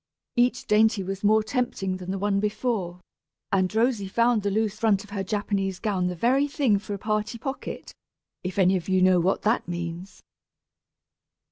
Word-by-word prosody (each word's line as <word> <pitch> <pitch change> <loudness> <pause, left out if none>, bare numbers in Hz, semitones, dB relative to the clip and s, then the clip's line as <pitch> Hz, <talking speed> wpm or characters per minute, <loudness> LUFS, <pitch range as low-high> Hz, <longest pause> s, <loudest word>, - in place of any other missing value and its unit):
Each 245 +1 +2
dainty 215 -1 +3
was 195 +2 -5
more 215 +1 +4
tempting 215 -6 -2
than 185 0 -8
the 195 - -1
one 200 0 0
before, 205 -4 -2 0.5
and 185 -2 +2
Rosy 225 -3 +1
found 235 +2 +2
the 200 - -1
loose 215 +1 -1
front 215 -3 +2
of 210 - -16
her 200 -1 -2
Japanese 195 -1 -2
gown 190 -4 -1
the 180 - -3
very 260 - +2
thing 265 -8 +1
for 205 0 -5
a - - -6
"party 215 +3 -2
pocket," 270 +4 -6 0.5
if 185 +1 -5
any 190 0 +4
of 180 - -7
you 185 0 +3
know 185 -1 +5
what 185 +3 0
that 220 -2 +1
means! 175 +2 -6
205 Hz, 175 wpm, -25 LUFS, 185-220 Hz, 0.5 s, know